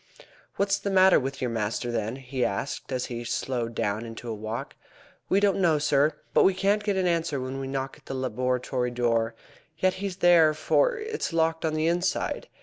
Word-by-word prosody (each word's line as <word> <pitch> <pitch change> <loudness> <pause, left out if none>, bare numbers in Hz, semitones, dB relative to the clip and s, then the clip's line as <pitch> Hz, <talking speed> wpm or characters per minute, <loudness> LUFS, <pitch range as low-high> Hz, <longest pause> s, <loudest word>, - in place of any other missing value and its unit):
"What 200 0 0
is 200 - +3
the 200 - -3
matter 190 -1 +6
with 135 +1 -5
your 125 -2 -1
master, 115 +2 -2
then?" 115 0 -2
he 130 -1 -3
asked, 125 +8 -3
as 130 -1 -1
he 120 -1 -5
slowed 120 -1 -2
down 105 +2 -1
into 115 +1 -8
a - - -2
walk. 110 +2 -5 0.5
"We 195 - +4
don't 200 -1 +2
know, 165 -4 +4
sir; 145 0 +2 0.2
but - - +5
we 190 - +4
can't 200 +2 +1
get 205 -2 0
an 185 - +1
answer 165 -4 0
when 130 +1 -4
we 135 - -4
knock 135 0 -4
at - - -24
the 135 - -4
laboratory 125 0 -1
door. 115 -2 0 0.4
Yet 185 +2 +2
he's 200 -2 -3
there, 170 -4 +5
for - - +2
it's 435 - -4
locked 165 0 +1
on 155 -1 0
the 155 0 0
inside. 175 +3 0
135 Hz, 205 wpm, -26 LUFS, 120-180 Hz, 0.5 s, matter